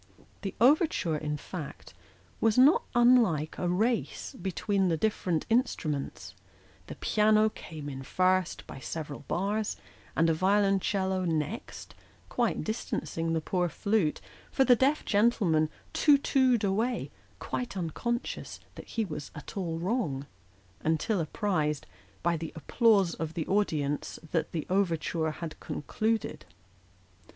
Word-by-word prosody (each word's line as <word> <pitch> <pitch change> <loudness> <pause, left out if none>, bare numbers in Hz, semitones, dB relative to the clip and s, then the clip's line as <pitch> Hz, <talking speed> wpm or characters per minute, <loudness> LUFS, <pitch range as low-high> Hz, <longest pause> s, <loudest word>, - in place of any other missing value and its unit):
The 195 - -4
overture, 255 - +3
in 150 0 -2
fact, 150 - -8 0.5
was 225 0 +2
not 275 +6 +6
unlike 235 - +4
a 175 - 0
race 220 +6 0
between 195 +1 0
the 165 -2 +1
different 180 -3 0
instruments; 180 - -1 0.5
the - - -7
piano 215 0 +3
came 155 -7 -9
in 135 -2 -5
first 185 +5 +1
by 135 - -9
several 150 0 -5
bars, 205 +4 -1 0.4
and 165 - +3
the 165 - +3
violoncello 190 +1 +2
next, 160 +5 -3 0.4
quite 240 -2 0
distancing 165 -7 -2
the 160 - 0
poor 180 +2 0
flute; 200 -5 0 0.3
for 270 - +3
the 250 - +7
deaf 275 +5 +2
gentleman 200 -8 +3 0.2
too 295 -2 +5
too'd 260 -5 +2
away, 220 +5 0 0.3
quite 245 -4 -4
uncon 195 - -1
scious - - -7 0.2
that - - -11
he 225 - -1
was 150 -5 -6
at 150 - -9
all 170 -5 -2
wrong, 170 - -1 0.6
until 160 +6 +1
apprised, 155 -4 -1 0.4
by 170 0 +2
the 165 0 -5
applause 195 - +3
of 160 0 -5
the 165 - -2
audience, 150 -8 0
that 165 - 0
the 160 -3 -3
overture 175 -4 0 0.2
was 165 -2 -4
concluded. 220 +8 -2
185 Hz, 130 wpm, -29 LUFS, 160-220 Hz, 0.6 s, the